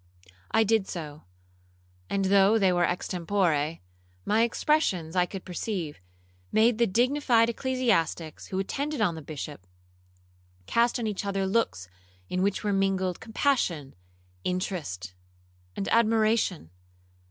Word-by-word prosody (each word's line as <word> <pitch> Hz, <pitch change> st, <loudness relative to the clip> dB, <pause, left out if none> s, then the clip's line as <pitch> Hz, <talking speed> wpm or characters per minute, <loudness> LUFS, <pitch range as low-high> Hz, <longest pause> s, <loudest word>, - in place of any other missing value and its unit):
I 225 Hz, -, +4 dB
did 220 Hz, -2 st, +2 dB
so; 155 Hz, -3 st, -7 dB, 0.8 s
and 195 Hz, -1 st, 0 dB
though 200 Hz, +3 st, +5 dB
they 190 Hz, -4 st, +3 dB
were 175 Hz, 0 st, +2 dB
extempore, 170 Hz, -3 st, 0 dB, 0.5 s
my 215 Hz, +2 st, +3 dB
expressions, 230 Hz, -, +1 dB
I 180 Hz, -1 st, +3 dB
could 195 Hz, 0 st, -8 dB
perceive, 180 Hz, -4 st, -4 dB, 0.5 s
made 225 Hz, +1 st, +3 dB
the 235 Hz, -, +4 dB
dignified 240 Hz, +1 st, +3 dB
ecclesiastics 230 Hz, -, -1 dB
who 190 Hz, -, -4 dB
attended 280 Hz, +10 st, -2 dB
on 205 Hz, -6 st, +2 dB
the 160 Hz, -, -7 dB
Bishop, 145 Hz, -, -7 dB, 1.0 s
cast 235 Hz, -, +2 dB
on 235 Hz, -, -3 dB
each 210 Hz, -2 st, -2 dB
other 195 Hz, -1 st, -1 dB
looks 190 Hz, -, 0 dB, 0.4 s
in 185 Hz, -, -1 dB
which 200 Hz, +1 st, 0 dB
were 205 Hz, -1 st, 0 dB
mingled 190 Hz, -2 st, 0 dB
compassion, 220 Hz, -, 0 dB, 0.5 s
interest, 160 Hz, -, -3 dB, 0.6 s
and 195 Hz, -, -3 dB
admiration. 220 Hz, -, +2 dB
195 Hz, 120 wpm, -27 LUFS, 170-225 Hz, 1.0 s, though